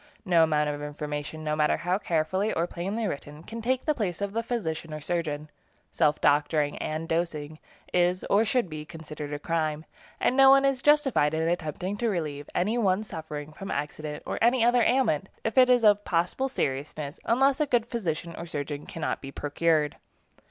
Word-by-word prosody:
No 175 -3 +4
amount 150 -2 +2
of 145 0 -3
information, 150 +1 -5
no 150 0 0
matter 150 0 +2
how 180 +3 0
carefully 185 +3 0
or 165 - 0
plainly 195 +6 -3
written, 150 -3 -5
can 230 +5 -7
take 255 +3 0
the 305 - +3
place 200 - -2
of 200 0 -3
the 230 - 0
physician 165 -10 -3
or - - -5
surgeon. 155 -2 -3 0.4
Self 150 0 +2
doctoring 145 0 +2
and 155 +1 -3
dosing 155 -2 -2 0.3
is, 180 +1 +2
or 205 +2 +4
should 235 -1 +1
be, 155 -2 -6
considered 155 -2 -8
a 145 - -2
crime, 155 0 -2 0.3
and 250 - +2
no 270 0 +8
one 275 0 +6
is 270 -2 +1
justified 270 - +3
in 160 +1 0
attempting 175 +3 -2
to 235 +1 0
relieve 150 -7 -3
any 215 +7 +1
one 195 -1 +2
suffering 155 -5 -7
from 195 +5 -8
accident 150 +1 -4
or - - -3
any 235 0 +4
other 240 0 +4
ailment, 225 - +2
if 225 - -2
it 255 -1 +6
is 245 -2 +5
of 205 -1 +5
possible 180 +10 0
seriousness, 145 - -3
unless 270 +4 +3
a 300 - +2
good 240 -4 +2
physician 175 -8 -3
or 170 - -7
surgeon 145 -1 -5
cannot 165 - -3
be 135 - -7
procured. 150 +1 0
165 Hz, 185 wpm, -27 LUFS, 150-220 Hz, 0.4 s, no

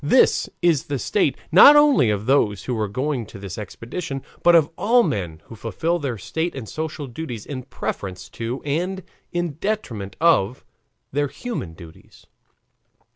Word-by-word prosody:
This 200 - +4
is 165 -6 +3
the 145 - -2
state, 150 +2 +1
not 240 - +10
only 295 - +5
of 105 0 -1
those 105 -7 +2
who 125 - -3
were 110 -2 -1
going 130 +2 -2
on - - -7
this 95 -1 -6
expedition, 135 - -6 0.2
but 175 0 +6
of 160 -2 +4
all 235 +6 +4
men 85 - -3
who 115 - -11
fulfill 140 - -1
their 135 -6 -3
state 160 - -3
and 125 -5 -6
social 155 +1 -4
duties 125 -4 -6
in 135 -3 -5
preference 95 -7 -5
to 120 +3 -5
and 180 +6 -2 0.3
in 175 -4 -2
detriment 120 - -3
of 130 -9 +2 0.5
their 145 +1 +1
human 135 - -6
duties. 80 -1 -15
135 Hz, 160 wpm, -22 LUFS, 105-170 Hz, 0.5 s, not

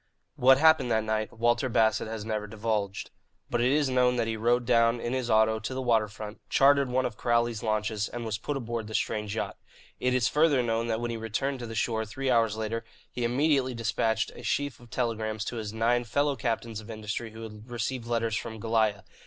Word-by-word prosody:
What 130 +1 +6
happened 160 -4 +5
that 110 -1 +2
night 110 0 -1
Walter 120 +2 +1
Bassett 110 -1 +2
has 110 -1 -5
never 105 -1 -2
divulged. 105 -2 -2 0.4
But 120 - +1
it 125 +2 +3
is 145 0 +3
known 125 -1 +3
that 120 -2 +1
he 115 0 -2
rode 120 +2 +1
down 115 0 +3
in 120 +1 -3
his 130 -2 -2
auto 110 0 +4
to 110 +4 -5
the - - -2
water 115 -3 +3
front, 105 +1 -9
chartered 140 -1 +4
one 130 +1 +1
of 115 -4 -4
Crowley's 120 -2 +1
launches, 110 -1 -1
and 120 -1 -5
was 105 -2 -2
put 145 +5 -3
aboard 115 -3 -4
the 110 - -5
strange 105 -1 -1
yacht. - - -3 0.4
It 125 0 +1
is 125 -1 +3
further 150 -3 +3
known 115 0 0
that 110 -1 0
when 120 0 -2
he 115 - -3
returned 125 +5 -2
to 120 - -5
the 115 - -7
shore, 110 -1 0
three 130 +5 -2
hours 115 -2 +2
later, 110 +1 -3 0.3
he 125 - -4
immediately 130 +1 +2
despatched 110 0 0
a - - -11
sheaf 140 +4 -1
of 120 -1 -16
telegrams 110 -2 -2
to 120 - -4
his 110 -2 -4
nine 115 +2 +1
fellow 140 +5 +1
captains 115 -2 -2
of 110 +1 -12
industry 110 +1 -4
who 110 0 -9
had 110 +1 -10
received 120 +1 -3
letters 115 -2 0
from 110 0 -5
Goliah. 110 -3 +1
115 Hz, 220 wpm, -28 LUFS, 110-125 Hz, 0.4 s, What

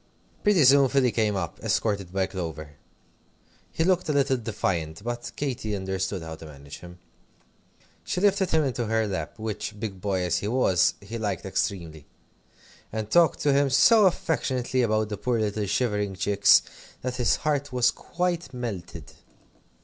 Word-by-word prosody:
Pretty 205 -7 +4
soon 135 0 +6
Philly 130 -3 +2
came 110 -3 0
up, 85 -4 -4
escorted 100 -3 -1
by 95 0 0
Clover. 80 -5 -6 1.0
He 160 - 0
looked 180 -1 +1
a - - +2
little 135 -2 +2
defiant, 95 -7 -3
but 120 0 -4
Katy 120 -7 -3
understood 95 -1 -3
how 80 0 -7
to 80 - -11
manage 70 -1 -11
him. 90 0 -12 1.1
She - - -2
lifted 195 -1 +2
him 160 -1 +2
into 125 -4 -2
her 110 0 +1
lap, 100 +2 -4
which, 110 -1 -5
big 100 -4 -5
boy 95 -2 -1
as 90 -1 0
he 100 - -4
was, 105 -7 +2
he 110 +4 -7
liked 100 -5 -3
extremely; 80 -6 -3 0.8
and 110 -1 -4
talked 170 -2 +4
to 145 -1 +3
him 140 0 +3
so 190 - +6
affectionately 130 -7 -1
about 110 -2 +1
the 105 - -4
poor 120 +1 -1
little 105 -1 -1
shivering 105 -3 -1
chicks, 100 +2 +4 0.4
that 125 -1 -3
his 125 -3 +2
heart 145 -2 -1
was 125 -1 +3
quite 175 -5 -3
melted. 115 -8 -6
110 Hz, 160 wpm, -26 LUFS, 95-135 Hz, 1.1 s, soon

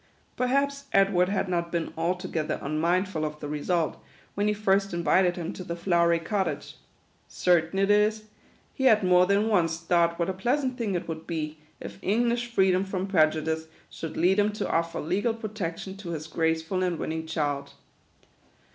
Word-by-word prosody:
Perhaps 280 +2 0
Edward 195 -2 +4
had 195 -1 0
not 170 -2 -1
been 170 -2 -2
altogether 170 -1 -2
unmindful 165 +4 0
of 150 0 -4
the 145 - -5
result, 155 +3 -1 0.3
when 205 +1 0
he 210 - +2
first 195 -2 +1
invited 175 +2 +3
him 170 -2 -4
to 185 - -7
the 170 -1 -4
flowery 170 -1 +2
cottage. 190 +4 -3 0.5
Certain 175 0 +1
it 195 +1 +3
is, 210 +1 +3 0.5
he 265 - -2
had 220 -5 +5
more 180 0 +5
than 200 +2 +2
once 170 -6 +2
thought 170 0 +1
what 170 - 0
a 190 - -1
pleasant 255 +7 0
thing 225 -6 -2
it 175 - -3
would 160 -1 -6
be, 155 -2 -4 0.2
if - - -9
English 235 +4 +1
freedom 190 -3 +3
from 190 -1 -3
prejudice 160 -3 +1 0.2
should 160 - -6
lead 185 +4 +3
him 205 +1 +3
to 210 - -3
offer 165 0 -1
legal 205 +8 0
protec 210 -7 -4
tion 190 0 -7
to 195 -3 -8
his 155 -2 -4
graceful 160 +3 -1
and 180 -2 0
winning 160 +1 -4
child. 145 -3 -2
180 Hz, 175 wpm, -27 LUFS, 165-200 Hz, 0.5 s, had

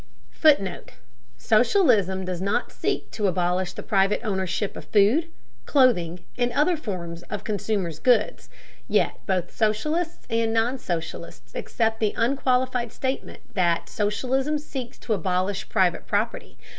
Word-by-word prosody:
[Footnote: 280 - +2 0.4
Socialism 200 - +3
does 180 -1 -3
not 200 +2 0
seek - - -2
to 210 -2 0
abolish 180 0 0
the - - -7
private 195 0 +2
ownership 195 -1 -2
of - - -8
food, 220 +11 +3 0.4
clothing, 180 - +3 0.2
and 245 0 +2
other 305 +5 +3
forms 175 - -5
of 210 -1 -4
consumers' 200 -6 -2
goods, 240 -4 +2 0.4
yet - - +1
both 185 -3 -1
socialists 305 +11 -1
and 230 -1 +1
non 235 +4 +1
socialists 160 - -5
accept 225 -1 -1
the 215 -2 0
unqualified 250 -1 +1
statement 265 +2 -4
that 175 -3 +1
"socialism 260 +8 0
seeks 265 -4 -7
to 225 - -2
abolish 185 +1 -1
private 180 -2 +1
property." 210 +3 -2
210 Hz, 130 wpm, -25 LUFS, 185-250 Hz, 0.4 s, Socialism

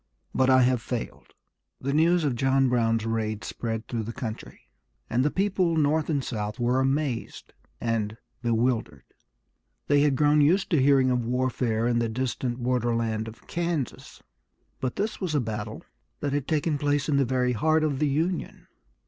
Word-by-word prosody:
But 130 0 +3
I 130 -1 +6
have 125 -1 +2
failed." 120 -1 -6 0.4
The 140 +1 -2
news 165 +3 +3
of 145 -4 +1
John 135 +1 +2
Brown's 115 -2 +1
raid 110 -2 -2
spread 115 -1 -4
through 115 -2 -2
the 110 +2 -5
country, 115 -2 -7 0.5
and 125 +2 +2
the 150 - +3
people 185 -2 +1
North 155 +1 +2
and 140 -4 0
South 105 -3 -4
were 120 +2 +2
amazed 135 -2 -2 0.3
and 110 -2 -1 0.2
bewildered. 115 - 0 0.8
They 145 0 +3
had 145 -2 +3
grown 150 +2 +4
used 175 +7 +3
to 155 -6 +4
hearing 135 -1 +4
of 125 -1 +1
warfare 120 -2 0
in 120 -1 +2
the 115 -1 0
distant 125 +1 -2
borderland 115 -3 0
of 110 +1 -11
Kansas, 170 -6 -4 0.6
but 130 - -2
this 215 +2 -2
was 175 -5 -1
a - - +3
battle 110 -4 -4 0.4
that 145 -1 -2
had 145 -1 -1
taken 155 -1 0
place 145 -1 +1
in 145 -2 +2
the 140 - +4
very 125 0 +1
heart 155 +6 +2
of 145 -4 0
the 150 - +2
Union. 165 +6 -2
130 Hz, 170 wpm, -26 LUFS, 115-150 Hz, 0.8 s, I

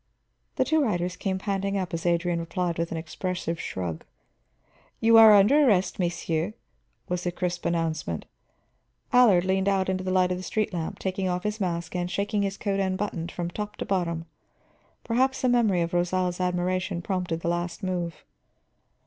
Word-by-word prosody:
The - - +2
two 315 -1 +2
riders 180 -6 -1
came 190 -2 -2
panting 195 0 -1
up 185 -2 -3
as 165 +1 -2
Adrian 170 0 +1
replied 170 0 -2
with 170 0 -1
an 165 - -2
expressive 170 +1 -4
shrug. 85 -4 -4 1.0
"You 225 0 +6
are 220 -2 +10
under 225 +10 +6
arrest, 195 -4 +2
messieurs," 175 +2 -1 0.5
was 180 0 -2
the 175 - -1
crisp 175 0 -2
announcement. 165 -1 -2 0.9
Allard 215 -8 +6
leaned 190 +1 +2
out 190 -1 +1
into 185 0 -1
the 185 - -3
light 185 -1 +3
of 180 - -1
the - - -7
street 215 +1 -1
lamp, 165 -2 -3
taking 190 0 -2
off 180 0 -2
his 210 0 -3
mask 170 -2 -2
and 175 0 -1
shaking 205 +2 -1
his 195 -1 -2
coat 200 -2 -1
unbuttoned 185 -3 -2
from 175 -1 -4
top 210 +2 -5
to - - -5
bottom. 170 -4 -1 0.8
Perhaps 260 +3 +1
a - - +4
memory 220 -7 +3
of 170 - -4
Rosal's 180 +1 0
admiration 180 0 -1
prompted 180 -4 -2
the - - -3
last 175 +1 -3
move. 175 -3 -3
185 Hz, 175 wpm, -26 LUFS, 175-195 Hz, 1.0 s, are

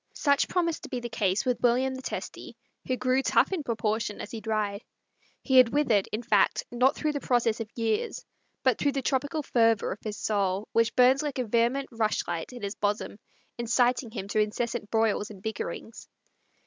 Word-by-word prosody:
Such 280 -2 +2
promised 335 -3 0
to - - -9
be 250 - -3
the 240 0 -6
case 200 -3 0
with 250 -1 0
William 255 +2 +2
the 260 - -6
Testy, - - -6 0.3
who 255 - 0
grew 255 +1 +2
tough - - +3
in 370 -4 -1
proportion 220 -4 -2
as - - -7
he 225 - -6
dried. 215 -2 -2 0.6
He 265 -2 +3
had 255 -2 +8
withered, 235 -8 +2
in 220 +3 -3
fact, 210 -3 +2
not 250 +3 +3
through 305 - -1
the 290 - -3
process 240 -4 +1
of 225 -2 -5
years, 225 -2 -1 0.4
but 260 -4 +2
through 285 -1 +1
the 270 -1 -2
tropical 285 +4 -1
fervor 230 -5 +2
of 210 - -5
his 210 -2 -5
soul, 200 -1 -1
which 230 0 +2
burnt 255 +2 +5
like 295 -3 -3
a 255 - -1
vehement 235 +5 +1
rush 225 -2 -1
light 170 +4 -4
in 245 -3 -10
his 200 0 -2
bosom, 205 0 -2 0.4
inciting 240 +1 +1
him 210 -3 -6
to 215 - 0
incessant 215 +1 -1
broils 220 -2 +1
and 200 -3 -12
bickerings. 220 +1 -5
235 Hz, 195 wpm, -27 LUFS, 215-260 Hz, 0.6 s, had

